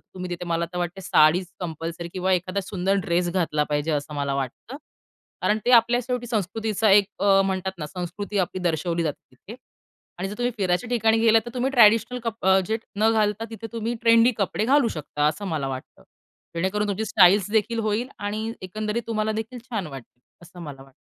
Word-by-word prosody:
तुम्ही 180 -1 -6
तिथे 175 0 -4
मला 170 0 0
तर 180 - -4
वाटते 175 +2 -3
साडीच 175 0 +4
कंपल्सरी 170 0 -5
किंवा 185 0 0
एखादा 185 +2 0
सुंदर 190 0 -1
ड्रेस 175 +1 +1
घातला 160 -5 0
पाहिजे 145 +2 0
असं 145 +1 -3
मला 140 -1 -1
वाटतं, 140 - -5 0.7
कारण 215 - +2
ते 245 - +2
आपल्या 235 +1 +5
शेवटी 250 -1 -2
संस्कृतीचा 220 0 0
एक 200 0 +7 0.2
अ, 195 -1 +5
म्हणतात 190 0 -2
ना 150 - -4
संस्कृती 185 +5 -5
आपली 185 0 -1
दर्शवली 170 0 0
जाते 150 -3 -5
तिथे - - -12 0.6
आणि 190 +2 -3
जर 205 - -6
तुम्ही 245 0 0
फिरायच्या 190 +3 0
ठिकाणी 225 -2 +3
गेलात 225 0 +5
तर - - -5
तुम्ही 255 +2 0
ट्रॅडिशनल 230 0 +5
कप 225 -4 -4 0.2
जे 220 - 0 0.2
न 220 +2 +3
घालता 215 0 +1
तिथे 225 0 -7
तुम्ही 230 +1 -2
ट्रेंडी 230 +1 +5
कपडे 200 +1 0
घालू 270 0 +4
शकता 150 -3 -2
असं 200 +6 -4
मला 150 -6 -2
वाटतं. 130 0 -8 0.5
जेणेकरून 205 +4 0
तुमची 205 +2 -1
स्टाइल्स 200 0 +5
देखील 225 +2 +1
होईल 220 +4 -1
आणि 215 +2 -3
एकंदरीत 215 +4 -3
तुम्हाला 220 -1 -1
देखील 225 +3 -5
छान 225 -8 -4
वाटेल, 130 -3 -11 0.2
असं 175 +1 -13
मला 140 -3 -9
वाटतं. 135 - -18
200 Hz, 190 wpm, -24 LUFS, 175-225 Hz, 0.7 s, एक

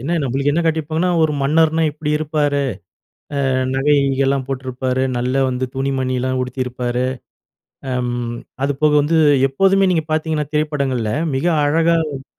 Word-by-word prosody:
என்ன 145 +8 -3
நம்மளுக்கு 135 +2 0
என்ன 170 - +1
காட்டிருப்பாங்கன்னா, 160 +2 0
ஒரு 155 - +2
மன்னர்னா 160 +3 +2
இப்டி 150 0 -4
இருப்பாரு. 150 -2 0 0.9
அ - - +1 0.2
நகை 140 +2 +2
கிகைகெல்லாம் 135 0 +1
போட்ருப்பாரு, 130 -1 -2
நல்ல 125 +2 -1
வந்து 130 0 -2
துணி 135 +1 -1
மணிலாம் 130 0 -1
உடுத்தியிருப்பாரு. 125 -1 -3 0.9
அம் 125 -1 -1 0.5
அது 145 - +1
போக 150 -1 +4
வந்து, 160 +3 +1 0.3
எப்போதுமே 195 +7 +3
நீங்க 160 -3 0
பார்த்தீங்கன்னா, 155 -1 -1
திரைப்படங்கள்ல 140 -7 -1 0.2
மிக 140 - -1 0.2
அழகா 165 +3 +3
காட்டி 135 -1 -7
140 Hz, 135 wpm, -19 LUFS, 130-155 Hz, 0.9 s, போக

